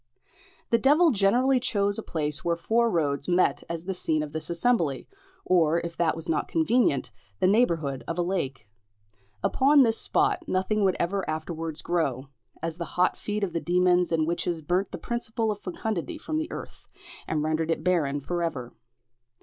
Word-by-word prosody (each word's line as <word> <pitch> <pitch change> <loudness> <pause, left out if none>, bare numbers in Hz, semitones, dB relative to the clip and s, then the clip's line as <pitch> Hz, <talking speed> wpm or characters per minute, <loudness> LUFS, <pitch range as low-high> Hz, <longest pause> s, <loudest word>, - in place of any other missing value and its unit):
The 230 - +4
devil 305 +6 +5
generally 245 +5 +3
chose 205 -3 0
a - - -2
place 150 -6 -2
where 170 -1 +1
four 230 +8 +1
roads 150 -7 0
met 180 +1 +2
as 170 0 -5
the 190 - -2
scene 155 -4 -1
of 150 - -7
this 160 +1 -5
assembly, 170 - 0 0.4
or 170 -2 +3
if 170 0 -6
that 165 -1 +1
was 165 +1 -7
not 160 -2 0
convenient, 240 - +1 0.3
the - - +2
neighbourhood 170 - +2
of 165 - -3
a 175 - +1
lake. 140 - -3 0.8
Upon 280 +1 +5
this 225 -2 0
spot 385 -3 +1
nothing 200 +1 0
would 190 -2 +3
ever 190 +3 0
afterwards 160 0 -4
grow, 140 -6 -1 0.3
as 165 0 -3
the 170 - -2
hot 180 - +3
feet 210 0 -3
of 180 -4 -2
the 170 - -1
demons 180 0 +2
and 160 -1 +2
witches 170 0 -2
burnt 180 +6 0
the - - -5
principle 225 -2 -2
of 205 - -5
fecundity 210 - -4
from 310 0 -3
the 315 - -4
earth, - - -9 0.4
and 155 -1 -1
rendered 155 +1 -1
it 160 -1 -1
barren 150 -6 +1
for 175 +5 -3
ever. 130 -8 -3
175 Hz, 180 wpm, -26 LUFS, 160-215 Hz, 0.8 s, devil